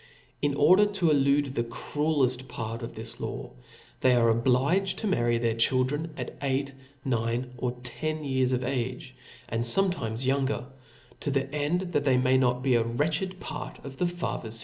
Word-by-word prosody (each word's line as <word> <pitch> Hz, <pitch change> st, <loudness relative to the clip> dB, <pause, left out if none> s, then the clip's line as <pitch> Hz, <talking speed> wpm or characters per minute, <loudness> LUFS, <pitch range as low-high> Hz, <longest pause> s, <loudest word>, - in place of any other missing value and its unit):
In 145 Hz, -1 st, +1 dB
order 185 Hz, +9 st, +6 dB
to 190 Hz, -6 st, +1 dB
elude; 140 Hz, -1 st, +3 dB
the 120 Hz, -, 0 dB
cruelleft 130 Hz, +1 st, 0 dB
part 115 Hz, -1 st, -5 dB
of 115 Hz, -, -7 dB
this 115 Hz, +1 st, -8 dB
law, -, -, -5 dB, 0.5 s
they 125 Hz, -1 st, +4 dB
are 115 Hz, -1 st, +4 dB
obliged 130 Hz, +11 st, +2 dB
to -, -, -4 dB
marry 120 Hz, -, +2 dB
their 115 Hz, -1 st, +1 dB
children 130 Hz, +7 st, +1 dB
at 125 Hz, -2 st, -5 dB
eight, 140 Hz, 0 st, -1 dB, 0.3 s
nine, 120 Hz, 0 st, -1 dB
or 125 Hz, 0 st, -1 dB
ten 155 Hz, +6 st, -3 dB
years 130 Hz, -2 st, +1 dB
of 130 Hz, 0 st, 0 dB
age, 130 Hz, +2 st, -3 dB, 0.4 s
apd 115 Hz, -, 0 dB, 0.3 s
fometimts 115 Hz, -6 st, -3 dB
younger, 135 Hz, -1 st, 0 dB, 0.5 s
to -, -, -2 dB
the 135 Hz, 0 st, -1 dB
end 150 Hz, +4 st, 0 dB
that 145 Hz, -, +1 dB
they 135 Hz, -3 st, +3 dB
may 130 Hz, +1 st, +3 dB
not 125 Hz, -1 st, +1 dB
be 135 Hz, -2 st, +3 dB
a 120 Hz, -1 st, +4 dB
wretched 155 Hz, +10 st, -1 dB
part 155 Hz, -, -6 dB
of 135 Hz, -1 st, -8 dB
the 180 Hz, -, +1 dB
father's 170 Hz, -10 st, -4 dB
fucceflSon. -, -, -1 dB
130 Hz, 175 wpm, -28 LUFS, 120-145 Hz, 0.5 s, order